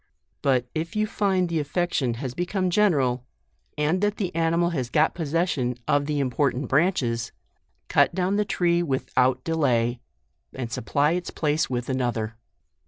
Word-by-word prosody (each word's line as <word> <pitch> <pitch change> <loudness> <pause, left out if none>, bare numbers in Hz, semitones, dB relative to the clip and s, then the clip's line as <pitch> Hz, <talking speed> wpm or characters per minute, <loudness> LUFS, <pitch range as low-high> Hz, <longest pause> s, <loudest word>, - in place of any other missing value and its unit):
But 130 -3 +2
if 165 +3 -4
you 215 0 +2
find 195 -4 +1
the 165 -1 -1
affection 145 -5 -1
has 125 +1 -5
become 180 +3 -1
general, 140 -12 +2 0.5
and 155 +5 +1
that 205 0 +1
the 185 -4 -2
animal 165 +1 +2
has 130 -7 -2
got 155 +4 +3
posses 165 +1 0
sion 125 -3 -1
of 145 -1 +2
the 150 -1 0
important 135 0 0
branches, 130 -7 +1 0.6
cut - - +3
down 190 +1 +1
the 210 - +2
tree 175 -3 +1
without 130 -4 +1
delay, 125 -7 +1 0.6
and 125 -3 -5
supply 145 +7 +1
its 180 +1 -2
place 150 0 0
with 125 -1 -2
another. 120 -4 -1
150 Hz, 155 wpm, -25 LUFS, 125-175 Hz, 0.6 s, got